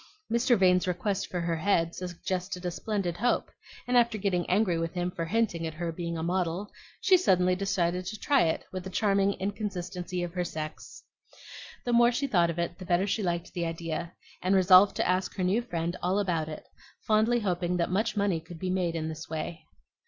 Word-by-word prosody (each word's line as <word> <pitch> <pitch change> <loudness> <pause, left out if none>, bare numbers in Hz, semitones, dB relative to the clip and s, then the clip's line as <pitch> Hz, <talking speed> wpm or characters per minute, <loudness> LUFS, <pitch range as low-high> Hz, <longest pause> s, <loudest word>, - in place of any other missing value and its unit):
Mr. 235 +1 +3
Vane's 180 -1 +4
request 185 +2 -1
for 180 - -2
her 170 -1 -1
head 170 -2 +1
suggested 180 +1 -4
a 175 - 0
splendid 190 -3 -2
hope; 245 +5 0 0.4
and 250 - +1
after 235 -2 +4
getting 190 -4 -1
angry 185 -3 +2
with 165 +2 -3
him 180 0 -1
for 165 -1 -3
hinting 170 -4 0
at 160 - -7
her 170 +1 -3
being 170 0 -4
a 160 - -3
model, 180 +2 -1 0.3
she 380 - +5
suddenly 185 - +3
decided 180 -2 0
to 215 +4 -5
try 280 -3 +3
it, 160 - -1
with 185 -1 -5
the 190 - -6
charming 200 0 +2
inconsistency 185 -3 -4
of 175 -1 -5
her 180 -1 -1
sex. 155 -2 -7 0.8
The 245 - 0
more 235 0 +6
she 265 +4 -1
thought 175 -10 +3
of 170 - -3
it, 170 +1 -2
the 185 - -7
better 175 +1 +2
she 205 +2 -1
liked 175 -3 -2
the 170 -1 -1
idea, 165 0 -4 0.3
and 185 +2 +2
resolved 185 +1 +7
to - - 0
ask 185 +1 0
her 185 - -2
new 195 +6 +2
friend 175 -6 -3
all 185 +2 +1
about 170 -6 0
it, 155 - -7 0.4
fondly 225 +2 +3
hoping 180 -2 0
that 170 0 0
much 215 +3 0
money 200 -5 +1
could 170 +1 -11
be 185 +2 -2
made 180 -3 0
in 160 -1 -2
this 160 +1 -7
way. 160 0 -5
180 Hz, 205 wpm, -28 LUFS, 170-200 Hz, 0.8 s, resolved